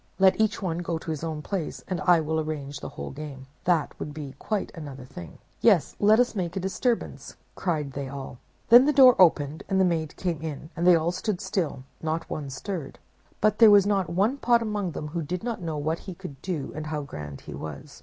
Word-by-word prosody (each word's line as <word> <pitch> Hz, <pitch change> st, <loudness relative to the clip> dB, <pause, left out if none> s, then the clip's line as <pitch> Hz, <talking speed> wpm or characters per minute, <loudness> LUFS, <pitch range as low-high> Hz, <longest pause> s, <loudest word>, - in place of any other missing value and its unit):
Let 190 Hz, +2 st, +5 dB
each 215 Hz, -2 st, +1 dB
one 170 Hz, -2 st, -1 dB
go 170 Hz, -1 st, -2 dB
to 160 Hz, -, -5 dB
his 155 Hz, 0 st, -4 dB
own 155 Hz, -2 st, -4 dB
place, 185 Hz, -4 st, -4 dB
and 185 Hz, -2 st, -2 dB
I 175 Hz, -2 st, +5 dB
will 160 Hz, +1 st, -1 dB
arrange 145 Hz, -2 st, -4 dB
the -, -, -6 dB
whole -, -, -7 dB
game. 140 Hz, -2 st, -8 dB, 0.2 s
That 170 Hz, -4 st, +2 dB
would 150 Hz, -, -6 dB
be 145 Hz, -3 st, -6 dB
quite 210 Hz, -3 st, -2 dB
another 140 Hz, -5 st, -8 dB
thing.' 85 Hz, -10 st, -10 dB, 0.2 s
'Yes, -, -, +4 dB
let 215 Hz, +2 st, +5 dB
us 245 Hz, 0 st, +3 dB
make 180 Hz, -4 st, -3 dB
a -, -, 0 dB
disturbance, 195 Hz, +6 st, -2 dB, 0.2 s
cried 155 Hz, -6 st, -2 dB
they 140 Hz, 0 st, -5 dB
all. 135 Hz, -2 st, -7 dB, 0.3 s
Then 245 Hz, +3 st, +9 dB
the 300 Hz, -, +3 dB
door 260 Hz, -3 st, +8 dB
opened, 155 Hz, -4 st, +4 dB
and 190 Hz, -, +2 dB
the 190 Hz, -, +5 dB
maid 160 Hz, -3 st, -1 dB
came 170 Hz, -5 st, -2 dB
in, 155 Hz, 0 st, -6 dB
and 170 Hz, +2 st, 0 dB
they 180 Hz, -, +8 dB
all 165 Hz, +1 st, +1 dB
stood 185 Hz, +1 st, -2 dB
still; 175 Hz, -10 st, -2 dB, 0.2 s
not 160 Hz, +1 st, -2 dB
one 145 Hz, -2 st, -4 dB
stirred. 140 Hz, +2 st, -5 dB, 0.4 s
But 215 Hz, 0 st, +2 dB
there 225 Hz, -2 st, +9 dB
was 205 Hz, -2 st, +7 dB
not 200 Hz, -3 st, +1 dB
one 200 Hz, +10 st, +1 dB
pot 235 Hz, -3 st, +3 dB
among 205 Hz, -5 st, -2 dB
them 150 Hz, -, -5 dB
who 170 Hz, +2 st, -3 dB
did 175 Hz, +5 st, -4 dB
not 235 Hz, -4 st, -3 dB
know 160 Hz, -3 st, -3 dB
what 155 Hz, +3 st, -1 dB
he 185 Hz, -, -8 dB
could 140 Hz, -4 st, -10 dB
do 165 Hz, -7 st, -3 dB
and 155 Hz, 0 st, -5 dB
how 150 Hz, -1 st, -3 dB
grand 75 Hz, -, -8 dB
he -, -, -9 dB
was. 75 Hz, -2 st, -8 dB
165 Hz, 225 wpm, -26 LUFS, 150-195 Hz, 0.4 s, Then